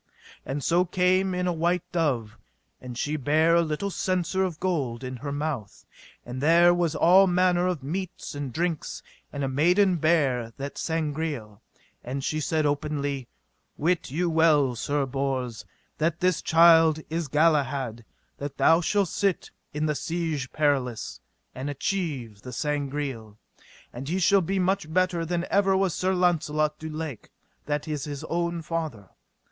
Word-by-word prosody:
And 140 +1 -3
so 175 +2 +3
came 185 +1 +1
in 180 0 -1
a 180 - +1
white 170 +1 0
dove, 135 - -1 0.5
and 125 -2 -8
she 150 +4 -1
bare 155 +4 +3
a 170 - +5
little 165 +5 -2
censer 185 0 0
of 175 -5 -3
gold 140 -10 -1
in 130 0 -5
her 140 +3 -5
mouth, 145 -8 -4 0.4
and 125 +2 -6
there 170 +3 +6
was 175 -3 0
all 190 +3 +6
manner 180 0 +2
of 175 -7 -2
meats 185 +6 -5
and 145 -2 -5
drinks; 165 +3 -3 0.3
and 140 -1 -4
a - - 0
maiden 175 +7 +3
bare 140 -8 +1
that 140 0 -6
Sangreal, 150 -9 -3 0.4
and 135 +2 -4
she 155 +2 -1
said 155 0 0
openly: 145 -3 -2 0.5
Wit 170 +3 0
you 170 +7 0
well, 155 -6 +3
Sir 145 +4 -1
Bors, 130 -3 -3 0.3
that 165 +1 0
this 180 -2 +1
child 165 -1 +6
is 165 -1 -2
Galahad, 140 -6 +1 0.4
that 145 +4 +3
shall 200 +4 +2
sit 195 +1 -1 0.2
in 150 +1 -2
the 150 - +1
Siege 160 -4 -3
Perilous, 130 - -1 0.3
and 135 +3 -5
achieve 140 - -3
the 125 - -8
Sangreal, 140 -6 -3 0.6
and 130 +4 -6
he 180 - 0
shall 195 +2 +4
be 195 +3 -1
much 185 -3 0
better 180 -1 +1
than 175 0 -1
ever 195 -1 +3
was 190 -3 +1
Sir 185 +1 0
Launcelot 155 -4 +1
du 160 - -6
Lake, 155 -6 -6 0.4
that 145 0 -2
is 150 -3 -3
his 145 -2 -6
own 170 0 -2
father. 155 - -4
155 Hz, 155 wpm, -26 LUFS, 140-175 Hz, 0.6 s, there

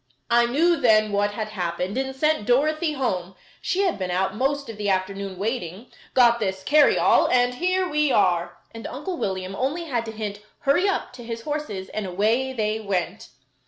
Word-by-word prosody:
I 235 0 +5
knew 330 +7 +3
then 215 -5 +4
what 205 0 +1
had 215 0 -4
happened, 180 -1 -3
and 265 0 -2
sent 305 -5 +1
Dorothy 305 +5 +2
home, 190 -10 -2 0.3
she 380 - 0
had 360 - 0
been 185 -1 -2
out 190 +2 0
most 275 +4 -1
of 225 -2 -8
the 205 -1 -1
afternoon 195 0 -2
waiting 210 0 -4 0.2
got 235 -2 +5
this 190 -3 -2
carryall, 295 +6 +4
and 245 0 +3
here 370 +6 0
we 300 -3 +1
are," 180 -5 +1 0.2
and 225 0 -7
Uncle 325 +8 -5
William 190 -3 -3
only 280 - -2
had 245 -8 -2
to 225 - -5
hint 210 -2 -5 0.2
"hurry 345 +8 +3
up" 390 - -2
to 245 - -10
his 230 0 -5
horses 260 -11 -4
and 215 -2 -4
away 220 +8 +1
they 215 -3 -1
went. 200 0 -3
230 Hz, 185 wpm, -24 LUFS, 195-275 Hz, 0.3 s, I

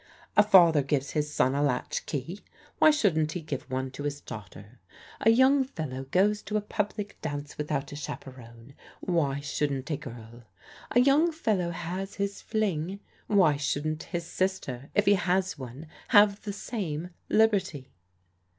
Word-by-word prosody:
A - - +8
father 175 -7 +6
gives 140 0 -1
his 150 -1 -1
son 130 -3 +2
a 140 - 0
latch 145 -4 -1
key; 165 +7 -4 0.4
why - - +7
shouldn't 165 - +2
he 180 - -3
give 145 -3 -6
one 130 0 -2
to 140 - -8
his 145 0 -3
daughter? 105 0 -10 0.4
A 225 - +4
young 260 +4 +5
fellow 150 - -5
goes 200 +9 +2
to 210 +1 -2
a - - 0
public 210 0 -4
dance 145 -1 -5
without 150 -2 -3
a - - -6
chaperon, 125 -4 -9 0.3
why 145 -6 0
shouldn't 140 -1 -2
a 150 - 0
girl? 120 -1 -11 0.4
A 245 - +4
young 290 +6 +4
fellow 215 - 0
has 180 +3 -5
his 200 0 -3
fling, 195 -4 -1 0.3
why 180 -8 +4
shouldn't 150 +2 -2
his 170 -2 -4
sister, 165 -9 -3
if 205 - +3
he 205 - +6
has 185 -2 0
one, 130 +4 -8 0.2
have 205 0 +5
the 205 - -5
same 180 -6 -4 0.2
liberty? 195 -11 +2
160 Hz, 160 wpm, -28 LUFS, 140-200 Hz, 0.4 s, A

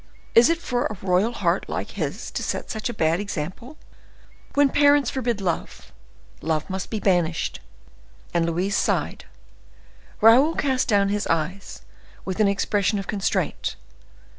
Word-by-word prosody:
Is 235 +4 +7
it 335 - +2
for 250 -7 -1
a 215 - -7
royal 190 +4 +2
heart 240 - -1
like - - -4
his - - -4
to - - -3
set - - -3
such 220 +1 -3
a - - -1
bad 165 -5 +1
example? 200 - -5 0.8
When 285 -1 +5
parents 285 -2 +4
forbid 240 -5 -1
love, 180 -4 -4 0.5
love 155 -1 -1
must 190 -1 -4
be 220 - -3
banished." 175 -5 0 0.7
And 170 -1 +2
Louise 180 +4 0
sighed: - - -1 0.9
Raoul 250 +9 +6
cast 260 -2 0
down 200 -3 +3
his 205 0 -1
eyes, 165 +4 -3 0.4
with 190 +2 -4
an 210 - +5
expression 200 +1 +1
of 195 - -4
constraint. 200 -2 -1
205 Hz, 145 wpm, -24 LUFS, 180-240 Hz, 0.9 s, Is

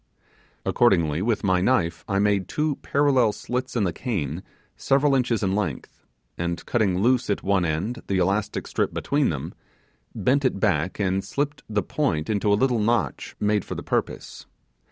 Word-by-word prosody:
Accordingly, 85 -9 +2
with 110 +1 0
my 95 -2 +2
knife 90 -7 +1
I 100 - 0
made 100 -1 +2
two 150 -2 -1
parallel 135 -6 +2
slits 125 +4 -4
in 115 - +2
the 90 -4 0
cane 85 - -3 0.3
several 140 +1 +2
inches 125 -4 +1
in 95 -1 +1
length, 95 -10 -4 0.3
and 85 0 -3
cutting 100 -7 +1
loose 125 -1 +2
at 100 - -1
one 95 -2 +2
end 90 +10 -2
the 95 - 0
elastic 95 +3 0
strip - - -1
between 145 -1 +1
them, 70 -4 -4 0.6
bent 140 +3 +2
it 130 -7 +1
back 95 -4 0
and 95 -1 0
slipped 140 +7 -3
the 105 -2 0
point 90 - -1
into 105 0 +1
a - - +5
little 125 0 +2
notch 115 +1 -1
made 105 -1 +1
for - - -6
the - - -6
purse. - - -3
105 Hz, 170 wpm, -24 LUFS, 95-125 Hz, 0.6 s, a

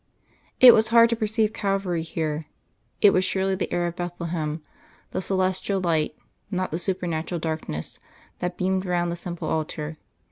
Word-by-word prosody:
It 250 -2 +11
was 220 0 +4
hard 230 0 +6
to - - +2
perceive 220 -1 0
Calvary 195 -4 -1
here; 160 -1 -3 0.6
it 205 - +8
was 185 - +3
surely 190 0 +1
the 190 - -2
air 175 0 0
of 170 0 -3
Bethlehem, 170 -3 -4 0.5
the - - -2
celestial 190 +1 0
light, 160 -4 0 0.3
not 185 -2 -2
the 165 - -2
supernatural 175 -2 -2
darkness, 155 - -4 0.4
that 180 0 -3
beamed 185 0 0
round 175 -2 0
the - - -2
simple 175 0 -5
altar. 155 0 -3
175 Hz, 155 wpm, -25 LUFS, 165-190 Hz, 0.6 s, It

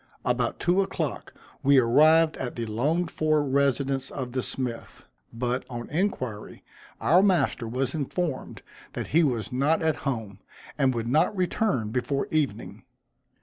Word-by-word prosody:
About 125 -1 0
two 180 +3 +2
o'clock 195 - -3 0.3
we 140 0 +5
arrived 155 +6 +5
at 125 -2 -4
the 115 - -3
longed 150 +11 0
for 155 -1 +1
residence 135 -1 0
of 130 -3 -5
the 130 +1 -1
smith; 125 -2 -5 0.3
but, 125 +2 -2
on 120 -1 -7
inquiry, 130 - -3 0.4
our 175 +4 +4
master 170 - +1
was 125 +2 -2
informed 155 -1 -3 0.3
that - - -5
he 165 +3 +4
was 125 -5 -1
not 140 +6 +1
at 160 -1 +1
home, 110 -8 -4 0.4
and 135 -3 +2
would 115 0 -2
not 160 - +2
return 180 - 0
before 135 +3 -1
evening. 155 -4 -2
135 Hz, 145 wpm, -26 LUFS, 125-155 Hz, 0.4 s, we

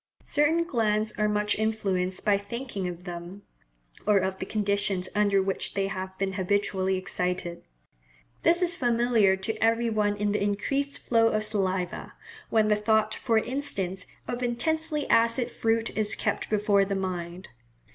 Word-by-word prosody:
Certain 320 +3 +2
glands 220 -7 0
are 210 0 +2
much 210 0 +1
influenced 195 -4 -1
by 205 -2 +4
thinking 200 -1 -4
of 175 0 -7
them, 175 +2 -8 0.6
or 210 -1 +5
of 190 0 -1
the 190 - -4
conditions 200 -3 0
under 200 -2 +3
which 195 0 -2
they 195 -1 +1
have 190 0 -5
been 195 -1 -1
habitually 190 0 0
excited. 180 -2 -2 0.8
This 345 +2 +3
is 345 -1 +4
familiar 235 -6 +3
to 190 +4 -2
every 230 +1 +2
one 205 -1 +1
in 205 0 0
the 210 - 0
increased 275 +8 0
flow 230 -1 +2
of 215 -1 0
saliva, 190 -4 -2 0.4
when 220 -1 +3
the 210 - +4
thought, 215 0 +2
for 230 -3 0
instance, 200 -8 -2 0.2
of 245 0 -3
intensely 300 +5 0
acid 230 +2 +3
fruit 225 0 0
is 215 -1 +1
kept - - -2
before 205 -1 +3
the 195 0 -2
mind. 180 -1 -4
210 Hz, 155 wpm, -27 LUFS, 190-230 Hz, 0.8 s, or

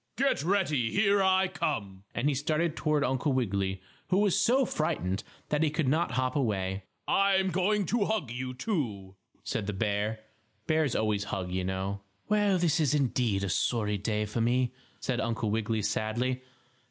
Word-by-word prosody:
"Get 275 - +2
ready. 155 - +1
Here 200 0 +3
I 190 0 +4
come!" 100 - -3
and 125 - +1
he 150 - +3
started 155 +4 0
toward 150 -2 +1
Uncle 135 +1 +1
Wiggily, 100 -6 -1 0.2
who 185 - +2
was 200 -2 +3
so 240 +7 +3
frightened 155 - -1 0.3
that 150 0 +1
he 160 - +3
could 150 -1 -1
not 160 +6 +1
hop 130 0 0
away. 95 -7 -1 0.2
"I'm 190 -1 +3
going 195 +3 +1
to 205 +4 +1
hug 195 - -1
you, 130 +1 -4
too," 120 - -3 0.3
said 100 - -3
the 105 - -1
bear. 105 +2 -1 0.4
Bears 155 -5 +1
always 105 -2 0
hug, 95 -3 -3
you 95 0 -1
know. 95 +1 -2 0.3
"Well, 205 -2 +3
this 170 -2 +2
is, 150 -2 +2
indeed, 120 -7 +1
a 100 - -1
sorry 105 +1 0
day 105 +1 -1
for 105 +3 -2
me," 125 +2 +2 0.3
said 125 -3 -1
Uncle 115 -2 -1
Wiggily, 110 0 0
sadly. 120 +5 -1
130 Hz, 170 wpm, -29 LUFS, 105-170 Hz, 0.4 s, I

